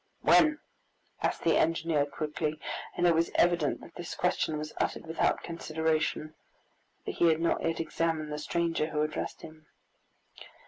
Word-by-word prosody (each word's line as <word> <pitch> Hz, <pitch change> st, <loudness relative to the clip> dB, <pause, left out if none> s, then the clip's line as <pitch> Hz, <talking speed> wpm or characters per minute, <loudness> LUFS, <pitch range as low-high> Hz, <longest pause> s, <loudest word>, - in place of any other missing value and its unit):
"When?" 310 Hz, -1 st, +6 dB, 0.6 s
asked -, -, -1 dB
the -, -, +4 dB
engineer 160 Hz, -2 st, +2 dB
quickly, 150 Hz, +1 st, -3 dB, 0.4 s
and 175 Hz, -, +2 dB
it 170 Hz, -, +6 dB
was 165 Hz, +1 st, +2 dB
evident 175 Hz, -4 st, +2 dB
that -, -, -13 dB
this 175 Hz, -1 st, -6 dB
question 170 Hz, -3 st, 0 dB
was 155 Hz, 0 st, -5 dB
uttered -, -, -2 dB
without 160 Hz, 0 st, 0 dB
consideration, 160 Hz, -2 st, -1 dB, 0.7 s
for -, -, -2 dB
he 170 Hz, -, +3 dB
had 160 Hz, -1 st, +3 dB
not 170 Hz, -, +1 dB
yet 165 Hz, -, -1 dB
examined 160 Hz, -1 st, -1 dB
the 150 Hz, -, -3 dB
stranger 165 Hz, 0 st, 0 dB
who 150 Hz, -1 st, 0 dB
addressed 155 Hz, 0 st, -4 dB
him. 155 Hz, -1 st, -12 dB
160 Hz, 150 wpm, -30 LUFS, 155-170 Hz, 0.7 s, When